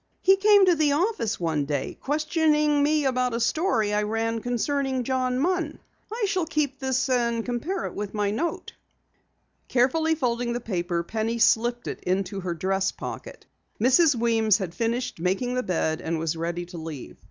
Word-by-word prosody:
"He 385 - +6
came 405 0 +6
to 365 - +5
the 305 -3 +2
office 295 - 0
one 160 -4 0
day, 140 -2 -3
questioning 300 0 +2
me 300 0 +2
about 250 -2 +1
a - - -1
story 235 - +1
I 210 - +2
ran 225 +2 -1
concerning 260 +2 -1
John 255 0 0
Munn. 335 +1 0 0.3
I 450 -1 -1
shall 375 -4 -1
keep 295 -4 -1
this 260 0 0
and 235 -3 0
compare 300 +10 -3
it - - -5
with 205 -1 -5
the 205 -1 0
note." 325 +11 -3 0.9
Carefully 315 +6 +2
folding 240 -4 -1
the 240 - -2
paper, 175 -6 -2
Penny 225 +5 -2
slipped 240 +1 +2
it - - -4
into 190 +1 -1
her 180 -2 -3
dress 190 +3 0
pocket. - - -8 0.3
Mrs. 265 +6 +4
Weems 225 -3 +3
had 185 -5 -5
finished 235 +2 -2
making 190 +8 -1
the 255 - 0
bed 160 -6 -1
and 165 0 -2
was 160 0 -2
ready 170 +1 -3
to 175 -1 -9
leave. 160 -4 -8
240 Hz, 175 wpm, -25 LUFS, 195-290 Hz, 0.9 s, He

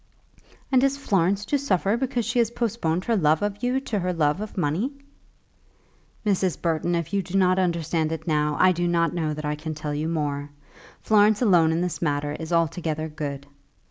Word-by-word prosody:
"And 260 -1 +4
is 275 0 +2
Florence 195 -5 +1
to 285 - 0
suffer 200 -6 +1
because 245 -2 -1
she 240 +3 0
has 230 -2 +3
postponed 215 -8 -1
her 230 - +1
love 155 -2 +2
of 205 0 -2
you 250 +2 +1
to 220 -6 -2
her 180 0 -1
love 155 +2 +1
of 215 -1 -7
money?" 180 - 0 1.3
"Mrs. 190 -3 +1
Burton, 170 +1 0
if 170 +2 -3
you 200 - +2
do 185 +1 -3
not 185 -1 +3
understand 165 -3 0
it 160 - -5
now, 150 -2 +1
I 185 - +6
do 175 0 -1
not 170 -1 +1
know 155 -3 -1
that 155 0 -6
I 150 - 0
can 155 +1 -5
tell 150 -1 -4
you 155 +2 -2
more. 145 -3 -2 0.5
Florence 210 +1 +4
alone 175 -7 +4
in 165 +1 0
this 180 -1 -3
matter 145 -2 -1
is 160 +2 -6
altogether 160 -1 0
good. 145 -2 -5
175 Hz, 195 wpm, -24 LUFS, 155-205 Hz, 1.3 s, I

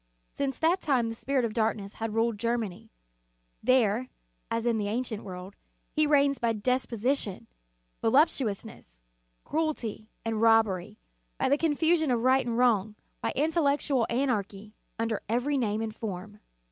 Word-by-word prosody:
Since 275 -2 -2
that 340 +4 +2
time 250 -6 +1
the - - -4
Spirit 260 +2 0
of 220 - -3
dark 225 -1 +1
ness 200 -1 -7
has 225 - -1
ruled 225 0 0
Germany. 230 -5 -2 0.7
There, 250 -1 +2 0.4
as 230 0 -1
in 230 -2 +2
the 205 - -1
ancient 225 0 -3
world, 185 0 -8 0.4
he 305 -1 +2
reigns 280 -1 +3
by 235 -2 +1
despotism, 240 -1 -1 0.6
volup 265 +7 +6
tuousness, 200 - -5 0.4
cruelty, 290 -9 -2 0.2
and 225 -1 -1
robbery, 220 -5 +3 0.4
by - - +1
the 285 - +4
con 320 -3 +1
fusion 320 -1 +2
of 240 -2 +1
right 260 0 +3
and 230 -1 -1
wrong, 220 -4 +2 0.3
by - - -1
intellectual 285 -4 +2
anarchy, 215 -5 -1 0.2
under 225 -2 -1
every 250 +6 +1
name 215 -2 0
and 220 -1 -5
form. 210 -1 -6
230 Hz, 150 wpm, -28 LUFS, 215-270 Hz, 0.7 s, volup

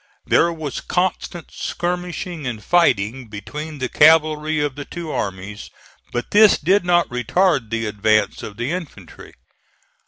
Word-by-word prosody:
There 170 - +3
was 155 -4 -5
constant 180 -1 -2
skirmishing 175 -3 -4
and 110 -4 -5
fighting 125 -7 +2
between 150 +9 -7
the 130 -1 -2
cavalry 155 +1 +4
of 145 -2 -1
the 145 +2 -7
two 170 +1 -7
armies, 100 +1 -5 0.4
but 120 0 -4
this 210 -1 +6
did 190 +6 +2
not 175 -1 +3
retard 125 - +1
the 115 0 -2
advance 105 0 +1
of 105 - -8
the 120 +5 -2
infantry. 150 - -8
150 Hz, 135 wpm, -20 LUFS, 115-175 Hz, 0.4 s, this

